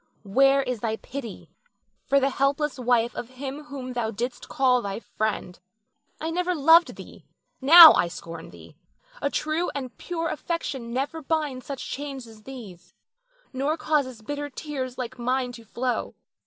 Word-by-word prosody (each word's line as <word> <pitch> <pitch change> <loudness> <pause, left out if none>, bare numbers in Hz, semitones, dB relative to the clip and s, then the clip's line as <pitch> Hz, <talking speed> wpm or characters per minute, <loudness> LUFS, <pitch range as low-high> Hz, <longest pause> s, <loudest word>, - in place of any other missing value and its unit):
Where 270 +7 +4
is 250 -3 -3
thy 220 0 -1
pity 240 -2 -8 0.6
for 280 - +4
the 275 0 +1
helpless 275 +1 0
wife 240 -1 +2
of 240 - -6
him 270 +3 -7
whom 260 -3 -7
thou 240 -2 -1
didst 240 +3 -5
call 255 -2 +3
thy 200 0 -4
friend? 215 -6 -3 0.6
I 320 +1 -3
never 360 +1 0
loved 325 +3 +5
thee, - - -13 0.3
now 320 +4 +11
I 175 - +2
scorn 165 -1 -9
thee. - - -15 0.4
A - - +1
true 310 +4 -1
and 255 -5 -5
pure 330 -2 -3
affection 275 -8 -4
never 275 +6 -2
binds 295 -4 -2
such 275 -2 -5
chains 275 -2 -5
as 220 -2 -15
these, 215 -8 -11 0.6
nor 280 +5 -1
causes 265 -8 -1
bitter 290 +4 -4
tears 260 -2 -5
like 250 0 -6
mine 250 +1 0
to 235 -1 -11
flow. 240 +3 -3
260 Hz, 155 wpm, -25 LUFS, 235-290 Hz, 0.6 s, now